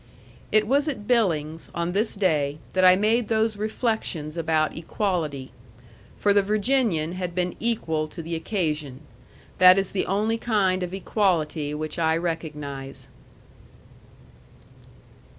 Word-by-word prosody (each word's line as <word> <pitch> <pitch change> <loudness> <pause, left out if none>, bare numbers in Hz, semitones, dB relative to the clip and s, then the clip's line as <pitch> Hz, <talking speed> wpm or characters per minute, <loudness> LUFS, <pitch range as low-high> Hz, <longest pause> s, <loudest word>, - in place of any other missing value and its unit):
It 215 0 +4
was 280 +6 +2
at 245 -9 -4
Billings, 165 -10 0
on 170 +1 -1
this 215 +4 0
day, 150 -7 +1 0.2
that 185 - +2
I 185 0 +8
made 215 +3 +2
those 220 0 +1
reflections 210 -8 -2
about 160 -2 0
equality. 160 -6 -2 0.7
For 205 - +3
the 200 - +5
Virginian 210 - +1
had 180 -1 -5
been 180 -1 -1
equal 160 -10 -1
to 165 +2 -8
the 165 +1 -5
occasion: 155 - -2 0.6
that 185 0 +8
is 195 -1 0
the 195 - -1
only 215 +4 0
kind 195 -6 +1
of 180 -1 -3
equality 165 -7 0
which 155 +2 -5
I 160 0 +2
recognize. 150 -5 -5
180 Hz, 130 wpm, -25 LUFS, 155-210 Hz, 0.7 s, I